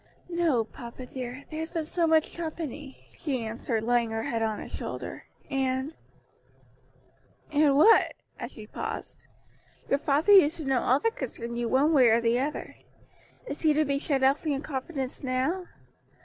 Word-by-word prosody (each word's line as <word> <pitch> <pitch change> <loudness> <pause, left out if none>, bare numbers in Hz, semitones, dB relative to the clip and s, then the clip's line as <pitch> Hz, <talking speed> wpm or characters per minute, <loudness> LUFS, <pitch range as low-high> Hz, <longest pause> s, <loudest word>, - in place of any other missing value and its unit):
"No, 335 -9 +2
papa 235 +3 -10
dear, 255 +1 -6
there 310 - -4
has 320 +1 -3
been 330 -2 -2
so 335 +2 0
much 320 -1 +3
company," 310 -4 -6
she 265 -8 -3
answered, 225 0 -2
laying 240 0 +2
her 225 0 -2
head 230 -1 -2
on 220 -1 0
his - - -9
shoulder. - - -6 0.2
"And 265 +2 -1 0.8
" - - -34
"And 290 -2 +4
what?" 440 +9 +6 0.2
as - - -6
she 215 - -10
paused. - - -6 0.7
"Your 275 - +3
father 300 +7 +3
used 335 -5 +7
to 315 - -6
know 270 -2 +2
all 260 +3 +3
that 455 - 0
concerned 235 -2 -5
you 235 -1 -1
one 285 +5 +3
way 260 -5 +6
or 225 +1 +5
the 235 +1 +2
other. 290 +3 -4 0.7
Is 300 - -5
he 310 -2 +4
to 310 +1 +2
be 280 0 0
shut 275 -2 0
out 270 +2 +4
from 315 - -4
your 270 - -2
confidence 270 -2 -4
now? 270 +8 -1
275 Hz, 175 wpm, -28 LUFS, 245-310 Hz, 0.8 s, used